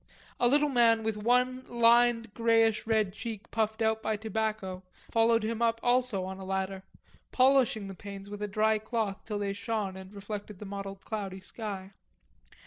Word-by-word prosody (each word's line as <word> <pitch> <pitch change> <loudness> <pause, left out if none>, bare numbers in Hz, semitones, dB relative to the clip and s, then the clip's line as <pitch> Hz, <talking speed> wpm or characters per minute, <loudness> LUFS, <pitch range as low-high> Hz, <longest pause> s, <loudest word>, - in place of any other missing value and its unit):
A 240 - +4
little 290 +4 +4
man 230 -4 +4
with 220 -1 -1
one 250 +4 +1
lined 235 -1 +4
greyish 225 -1 +2
red 215 -4 +2
cheek 225 0 -7
puffed 220 0 0
out 220 0 +1
by 220 -1 -1
tobacco 215 -3 -3 0.3
followed 230 -1 +3
him 225 +1 -2
up 230 -1 +2
also 245 -5 +2
on 190 0 -6
a - - -7
ladder, 190 0 -2 0.5
polishing 255 -5 +3
the 195 - -7
panes 195 +1 -9
with 205 0 -8
a 210 - -1
dry 215 +1 +2
cloth 220 -3 -2
till 210 -2 -3
they 200 -1 -1
shone 205 -2 -3
and 190 0 -10
reflected 205 0 -7
the 210 - -8
mottled 195 0 -7
cloudy 195 -3 -4
sky. 195 -1 -7
220 Hz, 170 wpm, -30 LUFS, 200-230 Hz, 0.5 s, A